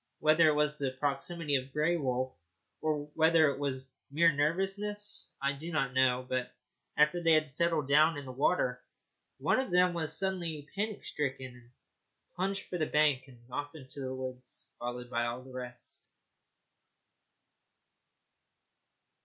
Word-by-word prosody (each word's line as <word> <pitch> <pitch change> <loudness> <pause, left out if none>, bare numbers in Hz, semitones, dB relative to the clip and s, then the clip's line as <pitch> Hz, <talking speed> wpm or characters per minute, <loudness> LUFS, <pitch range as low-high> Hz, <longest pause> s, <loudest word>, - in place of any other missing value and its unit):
Whether 155 +1 +5
it 155 - +4
was 150 0 +1
the 140 -2 0
proximity 145 +2 -1
of 130 +1 -6
Grey 150 +4 +2
Wolf 130 -4 -1 0.5
or 150 -2 0
whether 160 -2 +5
it 140 - -6
was 130 -2 -3 0.2
mere 165 +4 +5
nervousness 195 +7 0
I 140 0 0
do 160 +5 -7
not 135 -6 0
know, 130 -1 +3
but 125 0 -2 0.5
after 150 +4 +4
they 165 -1 +4
had 155 0 +4
settled 155 0 +1
down 155 +3 +5
in 145 - -6
the 130 - -6
water 125 -2 +1 0.6
one - - +2
of 260 - -1
them 180 0 +4
was 160 -3 -2
suddenly 170 -6 -2
panic 210 +1 -3
stricken, 130 -3 -3
and 120 -1 -17 0.6
plunged 195 +2 -1
for 180 - -5
the 155 - +1
bank 150 -3 +2
and 130 -2 -15
off 145 +4 -4
into 140 -1 -10
the 130 -1 -3
woods, 130 -1 -7
followed 125 0 -5
by 120 -1 +1
all 120 +2 -4
the 130 0 -13
rest. 125 -1 -8
145 Hz, 155 wpm, -31 LUFS, 130-165 Hz, 0.6 s, Whether